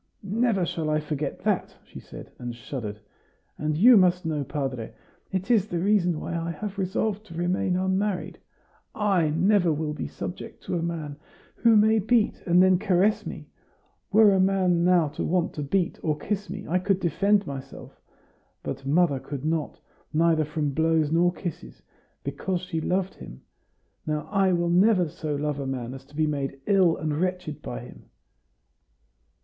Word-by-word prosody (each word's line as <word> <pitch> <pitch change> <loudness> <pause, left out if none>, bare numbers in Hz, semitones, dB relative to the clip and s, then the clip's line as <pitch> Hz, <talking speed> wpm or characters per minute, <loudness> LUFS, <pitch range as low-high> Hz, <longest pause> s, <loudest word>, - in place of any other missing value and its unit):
"Never 205 -1 +1
shall 160 -2 -3
I 155 0 +2
forget 150 -1 -4
that!" - - 0
she - - -11
said, - - -11
and 120 -1 -5
shuddered. 115 -3 -6 0.6
"And 150 0 -1
you 235 +6 +8
must 180 -1 +3
know, 155 -3 -1
padre, 135 -5 -4 0.4
it 190 +4 -1
is 215 -4 +3
the 175 - -3
reason 180 -3 +2
why 170 - -4
I 165 0 -2
have 200 +5 -5
resolved 205 +2 -1
to 170 - -10
remain 180 +1 0
unmarried. 190 +1 -1 0.6
I 195 -7 +2
never 180 +2 +3
will 150 0 -2
be - - -4
subject 175 - -7
to - - -3
a 170 - -1
man, 160 -4 -4 0.4
who 230 -2 +5
may 220 +1 +5
beat 220 +1 +1
and 175 +1 +6
then 185 -1 +4
caress 200 +1 +2
me. - - -8 0.6
Were 210 -1 +6
a 190 - +2
man 185 -2 +2
now 175 -3 +4
to 150 - -5
want 175 0 0
to 150 - -5
beat 170 +5 -1
or 155 -2 0
kiss 205 +6 -3
me, 200 +2 -6
I 180 +3 +1
could 190 +1 +1
defend 200 +4 +2
myself; 135 -2 -9 0.6
but 135 0 -5
mother 150 -2 +3
could 140 +1 -6
not 160 -1 -2 0.3
neither 160 0 +3
from 150 +1 -3
his - - -5
blows 160 0 +2
nor 175 +2 +3
kisses 160 - -7 0.4
because 170 +6 -2
she 175 -3 -3
loved 185 +3 -1
him. 60 - -11 0.7
Now, 150 -1 -2
I 195 -2 +3
will 170 0 +1
never 185 0 +4
so 150 0 -4
love 145 0 -2
a 135 - -3
man 125 -2 -4
as 135 0 -10
to 145 +2 -19
be 155 +1 +2
made 140 -2 -3
ill 190 -5 +4
and 155 0 -2
wretched 180 -4 -2
by - - -6
him." - - -14
170 Hz, 175 wpm, -26 LUFS, 150-190 Hz, 0.7 s, you